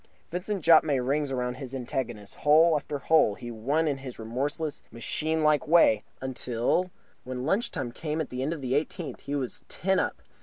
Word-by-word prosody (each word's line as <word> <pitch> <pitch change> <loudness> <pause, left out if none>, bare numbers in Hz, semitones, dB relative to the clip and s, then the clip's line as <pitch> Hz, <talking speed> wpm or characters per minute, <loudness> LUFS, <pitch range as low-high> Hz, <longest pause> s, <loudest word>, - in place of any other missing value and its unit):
Vincent 185 +1 -3
Jopp 160 0 +7
made 140 -4 +1
rings 140 +2 0
round 125 -1 -2
his 135 -1 -7
antagonist. 120 -5 -4
Hole 155 +3 +5
after 145 0 -2
hole 140 -7 +3
he 120 +2 -7
won 140 +9 0
in 140 -2 -1
his 130 -2 -8
remorseless, 140 +7 -3
machine 155 +7 -1
like 150 0 +3
way, 150 -10 +5 0.2
until 130 +6 -1 0.3
when 125 0 -5
lunch 195 +10 +1
time 120 -2 -4
came 155 +4 -3
at 155 - -3
the 125 0 -3
end 140 +4 -1
of 165 -4 -4
the 130 0 -1
eighteenth 150 -1 -2
he 145 - -4
was 130 -4 -4
ten 190 +3 0
up. - - -2
140 Hz, 190 wpm, -28 LUFS, 125-160 Hz, 0.3 s, Jopp